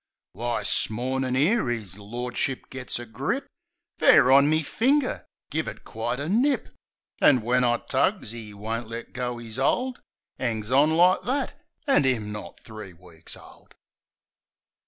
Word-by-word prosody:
Why! - - -2
'smornin', 130 +3 0
'ere 155 - +2
'is 105 -5 -4
lordship 120 +5 -3
gits 130 -1 -4
a 120 - -7
grip 110 -2 -3 0.5
Fair 130 - +6
on 140 +2 +6
me 155 +1 +2
finger 260 - 0
— - - -51
give 160 +2 -1
it - - -7
quite 120 +3 -3
a 145 - -3
nip! 250 - +1 0.5
An' 130 -4 +6
when 125 +2 +2
I 120 -1 +3
tugs, 185 - -1
'e 110 -3 -8
won't 110 +3 -4
let 115 +1 -7
go 125 -2 -3
'is 115 -1 -9
hold! 250 - 0 0.4
'Angs 110 -2 -2
on 140 +4 +5
like 180 +2 +5
that! 270 +3 -2 0.3
An' 270 - +3
'im 110 -5 0
not 105 - -7
three 110 -4 -10
weeks 85 -2 -13
old! - - -17
125 Hz, 155 wpm, -25 LUFS, 110-150 Hz, 0.5 s, Fair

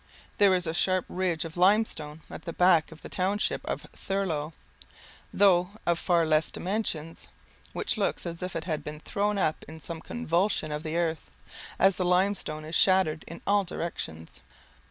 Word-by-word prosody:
There 200 -2 +6
is 180 -1 -1
a 160 - -2
sharp 185 +1 +2
ridge 175 -3 -1
of 165 - -8
limestone 180 -5 +2
at - - -10
the 170 - -4
back 175 -3 +4
of 160 - -13
the - - -6
township 195 +3 0
of - - -3
Thurlow, 170 -6 -2 0.8
though 180 -2 +4 0.2
of 170 0 +2
far 170 -3 +2
less 155 0 +2
dimensions, 175 -5 -3 0.4
which - - -1
looks 200 - 0
as 170 0 -5
if 180 0 -4
it 165 - -2
had 155 -4 -3
been 150 0 -7
thrown 205 +3 -1
up 155 -5 0
in 160 +1 -10
some 160 +1 -7
convulsion 180 -7 0
of 150 0 -3
the 160 0 -3
earth, 165 -2 -1 0.5
as 195 -1 +4
the 185 - 0
limestone 180 -4 +1
is 160 - -8
shattered 185 -4 +3
in 165 - -9
all 205 0 +3
directions. 80 - -6
175 Hz, 175 wpm, -28 LUFS, 160-190 Hz, 0.8 s, There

